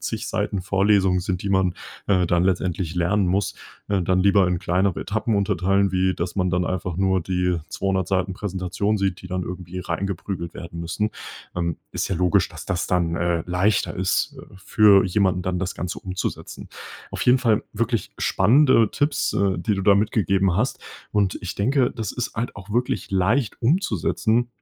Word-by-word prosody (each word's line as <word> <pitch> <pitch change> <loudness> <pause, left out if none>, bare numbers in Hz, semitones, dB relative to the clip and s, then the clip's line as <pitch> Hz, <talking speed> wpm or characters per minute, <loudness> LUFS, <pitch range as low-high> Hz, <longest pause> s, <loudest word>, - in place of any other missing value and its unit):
zig - - -4
Seiten 95 -2 -2
Vorlesungen 95 -1 +2
sind, 90 0 -3
die 100 - -2
man, 95 -2 +2 0.3
äh, 90 -3 +2
dann 85 +1 +2
letztendlich 90 -2 -1
lernen 90 +3 +1
muss, 95 +3 0 0.3
ne, 100 -2 +1
dann 95 +2 +2
lieber 100 0 +4
in 90 -1 0
kleinere 90 +2 0
Etappen 110 +1 -1
unterteilen, 100 0 +1
wie, 95 0 +2
dass 85 +3 -4
man 90 -2 +1
dann 90 0 +1
einfach 90 -1 -3
nur 95 0 +2
die 90 0 0
200 95 -2 -1
Seiten 95 -1 0
Präsentation 95 +2 -2
sieht, 95 -2 -1
die - - -8
dann 90 0 -3
irgendwie 90 0 -6
reingeprügelt 90 0 -4
werden 85 0 -8
müssen. 90 +6 -2 0.4
Ähm, 85 -2 -2 0.2
ist - - -2
ja - - -1
logisch, 90 -1 +2
dass - - -10
das 90 -1 -2
dann, 85 -2 0
äh, 85 -1 0
leichter 90 +4 +1
ist, 100 +10 0
äh, 110 - -16
für 100 0 +5
jemanden 95 -1 +1
dann 90 0 -2
das 95 0 -3
Ganze 90 0 -4
umzusetzen. 95 0 -5 0.4
Auf - - -4
jeden 125 +1 +5
Fall 115 -4 +2
wirklich 115 -1 -1
spannende 115 +2 +4
Tipps, 145 0 0
äh, 95 -3 +1
die 105 +4 0
du 95 - -3
da 100 +1 +6
mitgegeben 100 -3 +1
hast. 125 +6 -1 0.3
Und, 100 -3 +1
ich 90 - -4
denke 125 +4 +2
das 110 -5 -4
ist 125 - -4
halt 115 +2 -3
auch 100 0 -11
wirklich 120 +3 -1
leicht 105 +6 +1
umzusetzen, 120 - +1
95 Hz, 180 wpm, -23 LUFS, 90-105 Hz, 0.4 s, da